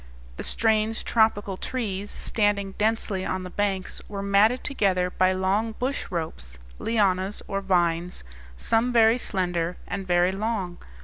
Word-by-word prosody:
The - - -4
strange 220 0 +1
tropical 205 -4 +2
trees, 205 -6 -3
standing 205 -2 0
densely 210 -3 0
on 185 0 -2
the 180 - -7
banks, 195 -2 -2
were 200 -1 -4
matted 205 +5 +3
together 185 -9 +1
by 185 0 +3
long 195 +4 0
bush 255 +4 -2
ropes 155 - -5 0.2
lianas, 200 -3 +1
or 195 0 -2
vines, 175 -2 0 0.3
some 230 - +1
very 230 0 +5
slender 180 -4 -1
and 195 -1 -4
very 175 +1 +3
long. 195 -3 -3
195 Hz, 135 wpm, -25 LUFS, 185-220 Hz, 0.3 s, very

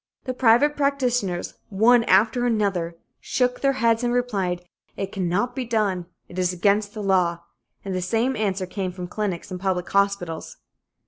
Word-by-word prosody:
The 255 - -3
private 255 +4 +4
practitioners, 250 -10 0 0.2
one 230 +4 +5
after 220 +6 +3
another, 195 -7 0 0.2
shook 250 -1 0
their 275 -1 +3
heads 230 -2 +2
and 240 - +1
replied: 195 -8 -1 0.3
"It 195 0 -3
cannot 195 +6 -1
be 260 - -2
done. 210 -7 0 0.2
It 180 - -7
is 180 -1 +2
against 205 +3 +1
the 210 - -4
law," 180 -3 +2 0.4
and 195 - -3
the 185 - -1
same 225 +8 0
answer 195 -4 -1
came 185 0 -3
from 180 0 -6
clinics 190 -2 -3
and 180 - -4
public 180 -2 -1
hospitals. 200 -5 0
200 Hz, 165 wpm, -24 LUFS, 185-240 Hz, 0.4 s, one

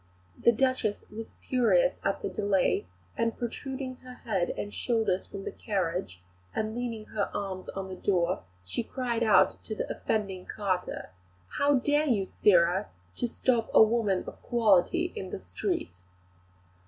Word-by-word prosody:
The 235 - +4
Duchess 245 -3 0
was 225 +1 -8
furious - - +4
at - - -1
the - - -1
delay, 200 - +1 0.3
and 230 0 0
protruding 260 +2 -4
her 255 0 -11
head 195 -8 -1
and 205 - -4
shoulders 220 -6 0
from 200 -1 -7
the - - -4
carriage 180 - -2 0.3
and 215 0 -1
leaning 230 -2 -4
her 205 -2 -1
arms 190 -2 -4
on 195 0 -4
the 190 - -6
door, 180 -2 +1 0.2
she 95 - -2
cried 240 -1 -2
out 220 -3 +4
to 215 - -5
the - - -3
offending 195 -4 -2
carter: 185 - -2 0.5
"How 285 0 +4
dare 290 +4 +2
you, 210 -7 +2
sirrah, 180 0 +3 0.3
to 245 - 0
stop 235 -1 +1
a - - +10
woman 215 -4 +2
of - - -9
quality 235 - +3
in 190 - -5
the - - -5
street?" 90 -1 -3
215 Hz, 155 wpm, -29 LUFS, 190-245 Hz, 0.5 s, a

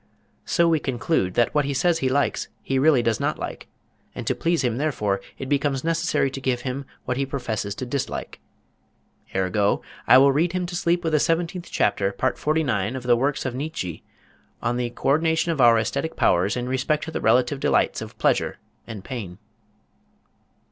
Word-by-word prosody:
So 170 -1 +2
we 165 -2 +3
conclude 130 - -1
that 120 - +2
what 150 -1 +3
he 140 0 -2
says 170 +3 +2
he 130 - +1
likes 140 +2 0 0.2
he 135 -1 0
really 140 -3 +4
does 115 -2 +1
not - - -1
like, - - -6 0.5
and - - -6
to - - +1
please 170 -2 0
him 120 -2 0
therefore, 105 -10 -1 0.2
it 135 - -6
becomes 140 -1 0
necessary 165 -4 +1
to 135 - -6
give 130 -2 0
him 135 +1 -4 0.2
what 125 - -2
he 140 - +1
professes 110 -7 -3
to 130 - -5
dislike. 130 +2 -4 1.0
Ergo, 95 +2 +1 0.2
I - - +8
will 140 +1 +6
read 165 +5 +1
him 180 -1 -1
to 175 0 -6
sleep 175 0 +1
with 160 -1 -1
the 155 - +4
seventeenth 170 +3 -1
chapter, 100 0 +1
part 130 +7 -1
forty 155 +2 +1
nine 110 -3 -1
of 130 - -5
the 120 -1 +4
works 135 +4 -1
of 130 - -2
Niet 150 +5 -5
Zhe 85 -3 -4 0.6
on 120 +1 -1
the 120 -1 -1
co 120 - -3
ordination 160 +3 +2
of 155 -5 0
our 120 -1 +7
æsthetic 115 +8 -1
powers 95 +6 +2
in 125 0 -3
respect 130 +4 0
to 160 - -5
the - - -3
relative 130 +3 +3
delights - - +1
of - - -9
pleasure - - +1 0.3
and 110 -5 -7
pain. 100 -9 -6
135 Hz, 195 wpm, -24 LUFS, 120-155 Hz, 1.0 s, I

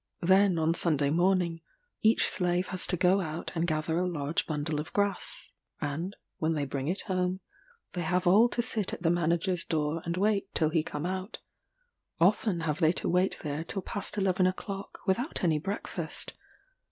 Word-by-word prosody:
Then, 190 0 +4
on 160 +1 +2
Sunday 150 -4 +2
morning, 175 0 +1 0.4
each 220 +1 +4
slave 180 0 +1
has 185 - +2
to 180 - -1
go 185 +3 +3
out 160 -1 -5
and 170 0 -1
gather 155 0 -1
a 180 - 0
large 150 -3 -2
bundle 150 0 -2
of 150 - -6
grass; 200 -2 +1 0.3
and, 165 +7 -3 0.2
when 160 +1 +1
they 145 -2 -1
bring 135 0 -4
it 185 +5 -1
home, 185 -1 -1 0.5
they 180 - -3
have 180 +2 0
all 210 +7 +6
to 240 - -1
sit 220 -4 -1
at - - -7
the 165 - +3
manager's 175 +1 0
door 155 0 -1
and 170 +1 -3
wait 200 0 +1
till 155 -2 +3
he 160 - +2
come 150 0 -5
out: 185 +3 -4 0.8
often 185 0 +2
have 155 -2 -2
they 160 +1 +4
to - - -4
wait 180 +2 +1
there 150 0 -3
till 190 +3 -4
past 205 +3 -2
eleven 185 -2 +2
o'clock, 195 +1 -5
without 220 +8 0
any 160 -4 +2
breakfast. 195 +6 -1
175 Hz, 180 wpm, -29 LUFS, 160-190 Hz, 0.8 s, all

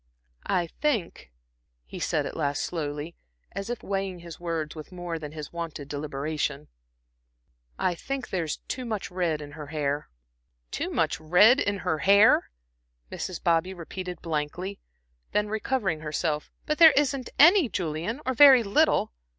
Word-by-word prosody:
"I 175 -2 +1
think," 195 - -2 0.5
he - - -9
said - - 0
at - - -6
last 145 -2 -1
slowly, 150 0 -4 0.4
and 195 - -5
as 195 +3 -6
if 240 - -4
weighing 195 -2 -3
his 170 -1 -10
words 165 -3 -3
with 155 +2 -9
more 175 -2 -5
than 150 -2 -7
his 150 0 -8
wonted 165 -4 -6
deliberation, 145 0 -3 1.1
"I 180 - +1
think 270 +8 -5
there's 165 -5 -2
too 255 - -4
much 220 -6 -4
red 170 -4 -1
in 145 - -10
her 150 0 -9
hair." 145 - -2 0.6
"Too - - -3
much - - 0
red 195 - +5
in 200 0 0
her 160 -3 0
hair," 200 +4 +5 0.6
Mrs. 185 - -5
Bobby 170 +2 +1
repeated 180 +1 -7
blankly; 165 +5 -3 0.5
then 210 0 +1
recovering 215 -5 -1
herself: 150 0 -2 0.2
"But 305 +1 -1
there 325 -3 +9
isn't 275 -3 0
any, 340 - +7
Julian, 175 - -3
or 260 - 0
very 265 -2 +8
little. 225 - +2
175 Hz, 150 wpm, -27 LUFS, 155-210 Hz, 1.1 s, there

